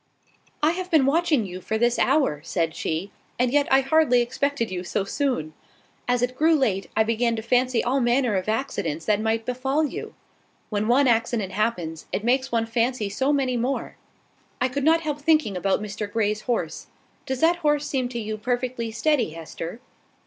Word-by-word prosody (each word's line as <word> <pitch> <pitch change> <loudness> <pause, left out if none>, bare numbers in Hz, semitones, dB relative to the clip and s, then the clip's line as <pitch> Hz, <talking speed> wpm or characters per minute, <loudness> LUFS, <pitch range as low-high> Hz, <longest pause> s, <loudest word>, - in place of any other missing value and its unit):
"I 305 - +5
have 365 +1 -4
been 310 -6 +4
watching 300 -4 +2 0.2
for 220 - -3
you - - 0
this 240 +1 +2
hour," 265 - +2
said 165 -3 -1
she; 170 +5 -3 0.3
"and 250 +1 +1
yet 290 -1 +3
I 265 0 +6
hardly 270 -3 +3
expected 250 -2 -1
you 180 -1 -3
so 190 - -1
soon. 200 - -2 0.5
As 245 0 +1
it 250 +1 -1
grew 320 +4 +4
late, 215 -10 0
I 220 - +5
began 230 +1 +1
to 220 - -5
fancy 250 +1 +2
all 260 +3 +1
manner 240 -2 +2
of 190 +2 -1
accidents 200 - -2
that 210 -1 +2
might 225 0 0
befall 265 +5 0
you. 285 - -6 0.6
When 210 0 0
one 260 +3 +4
accident 230 -4 +1
happens, 180 -7 -2
it 210 - -2
makes 260 +3 +1
one 230 -1 +1
fancy 230 -1 0
so 265 +8 0
many 265 -4 +1
more! 255 +4 -2 0.6
I 255 0 +1
could 280 +2 -3
not 325 +2 +4
help 300 -2 -3
thinking 305 -9 +2
about 195 +3 0
Mr 210 0 -5
Grey's 215 -1 0
horse. 200 -10 -3 0.4
Does 265 -1 -2
that 335 +2 +4
horse 295 -3 +1
seem 265 -4 -1
to 240 -1 -4
you 215 -1 -4
perfectly 245 0 -2
steady, 240 - +1
Hester? 165 +6 -7
240 Hz, 185 wpm, -24 LUFS, 215-275 Hz, 0.6 s, I